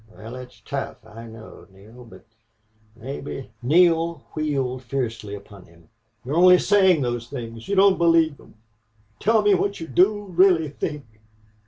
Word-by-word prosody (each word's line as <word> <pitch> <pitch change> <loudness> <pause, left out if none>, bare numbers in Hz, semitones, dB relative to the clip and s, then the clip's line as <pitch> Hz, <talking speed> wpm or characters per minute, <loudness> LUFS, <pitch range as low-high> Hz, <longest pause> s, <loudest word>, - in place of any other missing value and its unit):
"Wal, 110 +2 -11
it's 125 -1 -11
tough, 135 -5 -6
I 115 +2 -11
know, 110 -1 -13
Neale, 110 +6 -16
but 115 - -16 0.7
mebbe 135 +2 -7
" - - -41
Neale 165 +2 +2
wheeled 135 -5 -2
fiercely 115 -5 -4
upon 100 -2 -14
him. 85 -1 -22 0.4
"You're 135 - -4
only 180 +2 +6
saying 190 -6 +3
those 120 -1 -3
things! 115 -4 -8
You 200 - -1
don't 195 0 +4
believe 165 -3 +3
them! - - -19 0.6
Tell 220 0 +2
me 205 -1 +4
what 200 +2 -1
you 165 - -6
do 195 - +2
really 180 -4 +3
think." 150 0 -5
140 Hz, 155 wpm, -23 LUFS, 115-175 Hz, 0.7 s, only